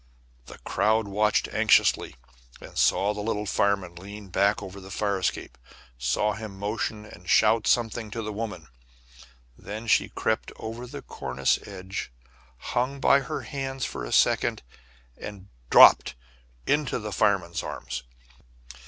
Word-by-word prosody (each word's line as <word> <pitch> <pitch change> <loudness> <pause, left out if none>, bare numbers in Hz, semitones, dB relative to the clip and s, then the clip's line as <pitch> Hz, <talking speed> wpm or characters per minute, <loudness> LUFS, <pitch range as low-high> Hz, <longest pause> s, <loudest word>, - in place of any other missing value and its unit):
The - - -11
crowd 110 0 +1
watched 105 +2 +1
anxiously, - - +3 0.4
and - - -12
saw 100 +2 +3
the 105 - -5
little 105 -1 -2
fireman 100 -3 0
lean 100 +3 -10
back 100 +3 +2
over 100 0 -9
the 95 - -11
fire 100 0 -1
escape, 65 -8 -3 0.4
saw 60 +13 0
him 110 -2 -8
motion 105 +1 -3
and 90 -3 -12
shout 110 0 +4
something 115 -2 +1
to 115 +2 -5
the 110 0 -4
woman. 100 -7 -5 0.9
And - - -19
then 110 +3 -5
she 115 - +3
crept - - -1
over 115 +3 -7
the - - -8
cornice 70 - -1
edge, 95 -7 -6 0.5
hung 130 - -2
by 140 0 +5
her 135 - -4
hands 135 -2 -4
for - - -5
a - - -6
second, - - +2 0.5
and 100 -2 -9 0.2
dropped - - +7 0.5
into 145 -3 +1
the 105 -2 -5
fireman's 95 -4 +1
arms. - - -5
105 Hz, 145 wpm, -26 LUFS, 95-110 Hz, 0.9 s, dropped